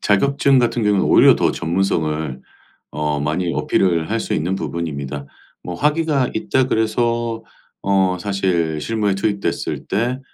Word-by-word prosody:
자격증 140 +6 +3
같은 120 -1 +1
경우는 105 -2 +2
오히려 - - +6
더 - - +1
전문성을 80 -6 -1 0.5
어 75 -1 -2
많이 85 +4 -1
어필을 85 -4 +1
할 - - 0
수 - - -2
있는 90 +5 -1
부분입니다. 75 -6 -4 0.4
'뭐 90 - -6
학위가 150 - +1
있다.' 130 +4 +1
그래서 115 0 0 0.4
어 95 -2 +2
사실 90 -5 -1
실무에 105 +2 0
투입됐을 100 +1 -2
때 120 +6 -1
95 Hz, 295 characters per minute, -20 LUFS, 80-115 Hz, 0.5 s, 오히려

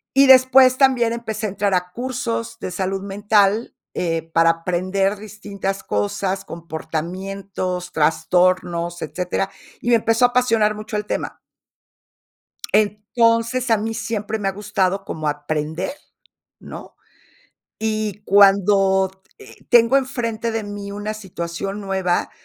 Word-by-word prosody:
Y 275 0 +6
después 260 0 +7
también 255 -4 +3
empecé 220 -2 -4
a - - -1
entrar 200 0 -1
a 180 0 0
cursos 115 - -4
de - - -5
salud 190 +1 -2
mental, 205 +2 +1 0.2
eh, 165 -2 -1
para 165 0 +5
aprender 185 +4 -1
distintas 200 -2 -5
cosas, 190 - -2
comportamientos, 180 +3 -5
trastornos, 175 +2 +1
etcétera, 180 +2 -2 0.3
y 240 - -2
me 240 - +6
empezó 225 +2 +3
a - - +6
apasionar 230 -4 +2
mucho 215 +1 -7
el 210 0 -2
tema. - - -4 1.3
Entonces, 230 +4 +1
a 225 - +5
mí 220 +2 -3
siempre 220 -1 -3
me 200 - -2
ha - - +1
gustado 195 -1 -1
como 155 -5 -4
aprender, 150 - -3 0.7
¿no? - - -10 0.8
Y 215 -2 -2
cuando, 195 -1 +4 0.3
eh, - - -14
tengo 240 +2 +6
enfrente 235 -4 -2
de 225 -1 -2
mí 205 0 -7
una 205 +1 -4
situación 195 0 -5
nueva, 190 -3 -1
200 Hz, 125 wpm, -21 LUFS, 180-220 Hz, 1.3 s, después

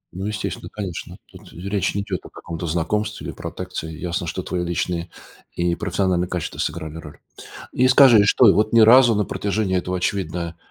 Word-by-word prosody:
.Ну, 95 +1 -4
естественно, 105 -2 -4
конечно. 95 -5 -6
Тут - - -16
речь 100 +3 -2
не 100 - -1
идёт 95 -3 -3
о - - -11
каком-то 85 0 -7
знакомстве 105 +7 -2
или - - -5
протекции. 80 0 -6
Ясно, 85 0 -3
что 85 +3 -4
твои 90 -1 -3
личные 85 0 -2 0.5
профессионыльные 90 +1 0
качества 90 -4 -4
сыграли 80 0 -3
роль. 75 -2 -11 0.6
И 130 - +3
скажи, 125 -5 +7
что 115 +2 +6
и - - +7
вот 110 +2 +1
ни 115 - +6
разу 120 +2 +7
на 105 0 +1
протяжении 100 -1 -1
этого, 90 +1 -2
очевидно, 90 -2 -3
95 Hz, 175 wpm, -22 LUFS, 85-105 Hz, 0.6 s, скажи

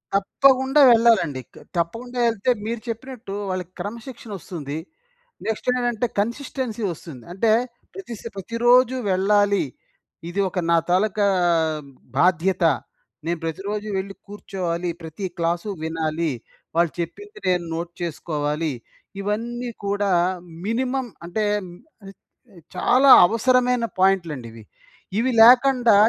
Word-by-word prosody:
తప్పకుండా 265 +7 +4
వెళ్ళాలండి. 225 - +4
క - - -24 0.2
తప్పకుండా 235 +9 -3
ఎళ్తే 225 +3 0
మీరు 230 0 -3
చెప్పినట్టు 230 -2 -6 0.2
వాళ్ళకి 185 -1 -4
క్రమశిక్షణ 230 +1 -7
వస్తుంది. 155 -5 -6 0.7
నెక్స్ట్ 220 +2 -3
ఏంటంటే, 245 -1 0
కన్‌సిస్టెన్సీ 235 0 -3
వస్తుంది. 155 -6 -10
అంటే, 215 +3 +2 0.4
ప్రతిస్ 240 - -8
ప్రతిరోజు 240 +5 +3 0.2
వెళ్ళాలి. 200 +1 +3 0.7
ఇది 195 +3 -4
ఒక 180 - -3
నా 170 - +5
తాలూకా 200 +2 +2 0.9
బాధ్యత. 180 +3 +2 0.6
నేను 170 0 -1
ప్రతిరోజు 200 +6 -4
వెళ్ళి 195 +1 -4
కూర్చోవాలి. 180 -4 -4
ప్రతి 160 +4 -6
క్లాసు 170 +4 -1
వినాలి. 160 0 -1 0.4
వాళ్ళు 170 -1 +3
చెప్పింది 410 - -6
నేను 180 -1 +2
నోట్ 170 +1 -4
చేసుకోవాలి. 150 -2 -2 0.5
ఇవన్నీ 235 +4 -3 0.2
కూడా 200 0 0 0.5
మినిమమ్ 250 +2 -1 0.2
అంటే, 210 +4 -1 0.2
హ్మ్. 175 -1 -11 0.3
ఆహ్, 195 - -10 0.6
చాలా 255 +9 +4 0.2
అవసరమైన 250 +1 +2 0.2
పాయింట్లండి 165 -11 +1
ఇవి. 115 -1 -12 0.6
ఇవి 255 +3 +1
లేకండా 245 -1 +7
205 Hz, 110 wpm, -23 LUFS, 170-240 Hz, 0.9 s, లేకండా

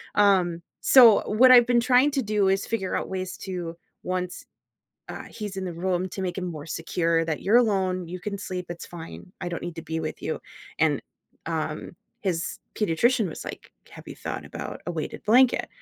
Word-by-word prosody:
um, 185 -4 +3 0.2
so, 235 -5 +8
what 250 +4 +6
I've 245 -1 +8
been 245 -1 +4
trying 250 +4 +4
to 270 -3 0
do 210 -2 +1
is 195 +1 +1
figure 190 -5 -2
out - - -2
ways 185 0 -4
to 175 -3 -5 0.3
once, 180 0 -3 0.7
uh, - - -7
he's 205 -3 -6
in 190 - -3
the 175 - -4
room 185 +1 -1
to 190 - -5
make 180 0 -3
him 180 - -3
more 155 -3 -6
secure 165 0 0
that, 160 -2 -2
"You're 210 +5 +4
alone, 190 -6 +1
you 180 - -5
can 200 +1 -4
sleep, 185 -2 -5
it's 175 - -6
fine, 170 +1 -10
I 175 - -2
don't 170 - -4
need 175 -1 -6
to 165 - -6
be 160 0 -3
with 155 -1 -5
you," - - -3 0.4
and, - - +2 0.5
um, - - -3 0.3
his 180 -3 -2 0.2
pediatrician 215 +3 +2
was - - -8
like, - - -8 0.2
"Have - - -13
you - - -7
thought - - -5
about - - -7
a - - -1
weighted 160 -2 -5
blanket?" 245 +4 +4
185 Hz, 195 wpm, -26 LUFS, 175-210 Hz, 0.7 s, so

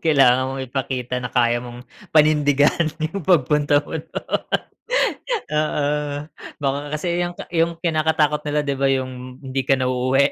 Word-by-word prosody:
Kailangan 130 -4 +5
mong 135 0 -4
ipakita 125 -1 -3
na 125 - -4
kaya 120 0 +2
mong 120 0 -9 0.2
panindigan 150 0 +4 0.2
yung 200 - -3
pagpunta 150 -3 +3
mo 160 - -4
do'n. - - -19 1.5
Oo. 150 -1 +1 0.7
Baka 140 0 +1 0.2
kasi 175 +2 -1
yung 175 0 -2
ka - - -7
yung 165 0 +1
kinakatakot 155 -2 +2
nila 150 0 +1
'di 140 -1 -1
ba 135 - +3
yung 130 -1 -4
hindi 130 0 -2
ka 135 - +5
na 130 - 0
uuwi? 130 +2 +3
140 Hz, 150 wpm, -21 LUFS, 130-155 Hz, 1.5 s, Kailangan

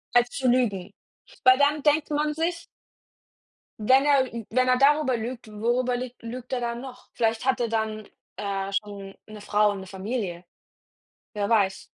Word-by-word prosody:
Als 245 0 +5
zu 260 0 -2
lügen, 210 -6 +1 0.5
weil 255 0 +7
dann 290 +1 +2
denkt 300 +1 +2
man 300 +1 0
sich 335 +2 -2 1.1
wenn 260 +6 +4
er 275 -4 +3
ü 230 -2 -5
wenn 255 +2 +2
er 255 0 +4
darüber 280 -1 +3
lügt, 235 +1 -6
worüber 240 +4 0
lüg 250 0 -5
lügt 245 +2 -7
er 255 - 0
dann 235 0 -3
noch? 250 -1 -11
Vielleicht 225 -1 0
hat 265 -1 +2
er 235 -1 0
dann, 220 -1 -2 0.3
äh, 195 -1 -3
schon 200 -1 -4
'ne 215 -1 -10
Frau 210 0 +2
und 200 - -5
'ne 190 - -9
Familie, 190 -2 -4 0.9
wer 205 -1 -2
weiß. 195 -4 +2
235 Hz, 170 wpm, -25 LUFS, 210-255 Hz, 1.1 s, weil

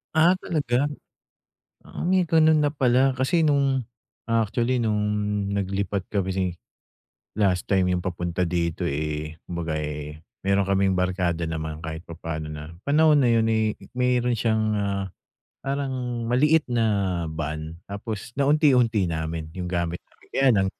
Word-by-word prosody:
Ah, 170 +4 +5
talaga? 145 -6 0 1.0
Ah, - - -7
may 185 0 +4
ganun 160 -2 +4
na 145 - +2
pala. 130 -2 +3
Kasi 160 +6 +2
no'ng 140 -3 +2 0.5
actually 115 +2 +1
no'ng 105 -2 +1 0.5
naglipat 100 -1 -2
kami, 95 -3 -1 0.8
last 95 -4 +1
time 95 -2 +2
yung 90 - +1
papunta 90 0 -1
dito, 85 -1 -1
eh, 75 +2 -3
kumbaga, 85 -3 -3
eh, 75 0 -5 0.2
meron 100 0 +3
kaming 95 -1 +2
barkada 90 -2 0
naman 80 0 -4
kahit 80 +2 -6
papano, 80 -2 -5
na 75 +1 -7 0.2
panahon 150 +1 +5
na 130 - +4
yun, 115 -1 +4
eh, 110 -1 +1 0.2
meron 125 -1 +1
siyang, 110 0 +1
ah, 100 -1 -1 0.6
parang 130 -4 -3
maliit 150 +7 +3
na 100 -7 +1
van, 80 0 -4
tapos 105 +3 -6
naunti-unti 135 - +4
namin 80 -1 -3
yung 90 0 -5
gamit 85 -1 -2
namin. - - -27
Kaya 135 0 +3
lang 95 - +3
100 Hz, 135 wpm, -25 LUFS, 85-125 Hz, 1.0 s, Ah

